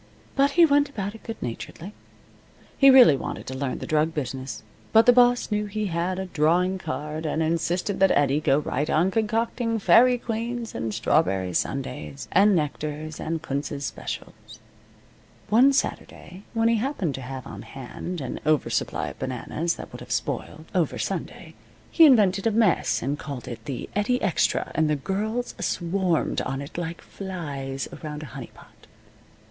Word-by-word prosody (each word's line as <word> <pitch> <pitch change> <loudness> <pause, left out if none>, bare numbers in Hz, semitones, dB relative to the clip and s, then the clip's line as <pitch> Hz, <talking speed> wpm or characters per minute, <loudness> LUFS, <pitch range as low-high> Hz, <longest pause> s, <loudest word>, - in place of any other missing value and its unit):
But 280 +1 +3
he 340 - +9
went 285 -2 +3
about 205 -6 -4
it 225 - -12
good 225 -1 -7
naturedly. 165 - -6 0.8
He 275 - +7
really 255 - +8
wanted - - -5
to 130 - -6
learn 130 -1 -2
the - - -6
drug 155 0 +1
business, 130 -4 -4 0.3
but 225 0 +6
the 245 - +7
boss 245 -1 +4
knew 210 0 0
he 210 +1 -3
had 175 +2 -1
a 190 - -3
drawing 180 +3 +1
card, 150 +1 -4
and 155 +2 0
insisted 170 +4 -1
that 195 0 +5
Eddie 145 0 +2
go 135 -2 +3
right 145 0 -2
on 175 +5 +2
concocting 225 +2 0
faerie 235 +6 +5
queens 235 0 -4
and 115 - -3
strawberry 95 -4 +1
sundaes, 75 - -3
and 200 +1 +5
nectars 155 0 -3
and 160 0 -3
Kunz's 140 +1 -3
specials. - - -7 0.9
One 245 +7 +6
Saturday, 190 -8 -3
when 225 0 +3
he 230 0 +3
happened 215 - -1
to 135 - -6
have 130 0 -7
on - - -8
hand 145 +6 -7
an - - -5
over 155 -2 +1
supply - - -1
of - - -12
bananas 170 +2 -2
that - - -9
would - - -8
have - - -10
spoiled - - -3
over - - +1
Sunday, - - -4 0.4
he 325 -2 +7
invented 205 -6 +4
a - - +3
mess 195 - +2
and 140 +4 -2
called 140 -5 -7
it 120 -2 -8
the 135 -3 -5
Eddie 210 +5 +1
Extra, 195 -4 0
and 155 -1 +2
the 150 - +2
girls 215 - -2
swarmed 175 -1 0
on 135 0 -3
it 140 +3 -8
like 170 0 -4
flies 145 -8 -5
around 150 -1 -6
a 130 -5 -10
honey 135 -3 -7
pot. - - -19
170 Hz, 170 wpm, -25 LUFS, 145-220 Hz, 0.9 s, he